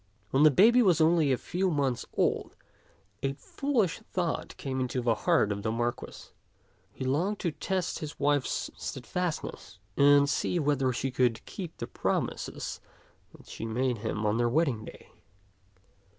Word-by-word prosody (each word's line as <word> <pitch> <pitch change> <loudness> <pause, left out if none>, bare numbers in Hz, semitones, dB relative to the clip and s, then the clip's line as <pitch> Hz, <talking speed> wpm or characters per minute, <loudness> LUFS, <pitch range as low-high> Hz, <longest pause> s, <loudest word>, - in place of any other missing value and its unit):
When 135 - +3
the 155 - +8
baby 225 - +6
was 180 -7 +4
only 160 -2 +4
a 130 - +2
few 185 +7 -1
months 140 -6 -1
old, - - 0 0.7
a 135 0 0
fool 270 - 0
ish 185 +1 -3
thought 180 -7 -3
came 130 -1 -3
into 125 0 -1
the 120 -2 +2
heart 105 -1 +2
of 100 0 -3
the 110 +1 -1
Marquis. 120 +1 -4 0.6
He 130 - -6
longed 170 +11 0
to 170 - 0
test 185 +3 -2
his 155 -1 -7
wife's 145 -1 0
steadfastness, 160 +7 -4 0.2
and 140 0 +6
see 160 - 0
whether 140 -4 +1
she 125 +1 -3
would 120 -2 +2
keep 180 -5 -7
the - - -4
promises - - -3 0.6
that - - -18
she 115 - -6
made 120 +1 0
him 110 0 -3
on 105 +1 +2
their 120 0 +2
wedding 130 -6 +1
day. - - -13
140 Hz, 160 wpm, -29 LUFS, 120-170 Hz, 0.7 s, the